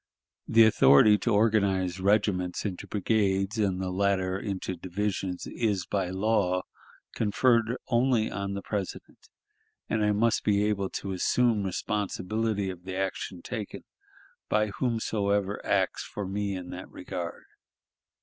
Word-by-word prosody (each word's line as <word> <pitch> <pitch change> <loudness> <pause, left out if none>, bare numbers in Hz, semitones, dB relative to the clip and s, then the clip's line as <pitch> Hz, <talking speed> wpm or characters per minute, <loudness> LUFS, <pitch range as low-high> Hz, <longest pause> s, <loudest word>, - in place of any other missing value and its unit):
The 115 0 +6
authority 105 0 +6
to - - -1
organize 100 -4 +2
regiments 95 -2 +1
into 95 -3 -4
brigades 100 0 0
and 95 -3 +1
the 95 -1 -2
latter 95 -1 +1
into 95 -3 -4
divisions 95 +1 -3
is 105 -5 -1
by 95 -3 -1
law 95 -2 +1 0.5
conferred 115 +2 +2
only 120 -2 +2
on 100 0 -3
the 100 - -5
President; 100 -3 -6 0.6
and 110 -1 0
I 105 - +3
must 110 +2 +2
be 105 -1 +2
able 100 -2 0
to 95 - -5
assume 115 +4 +2
responsibility 105 +1 -2
of 90 -1 -11
the 95 0 -6
action 95 -2 -3
taken 110 -5 -6 0.7
by 105 0 +2
whomsoever 105 -3 -1
acts - - +1
for 105 - -6
me 100 0 -2
in 90 -1 -7
that - - -8
regard. 85 -1 -6
100 Hz, 130 wpm, -28 LUFS, 95-110 Hz, 0.7 s, The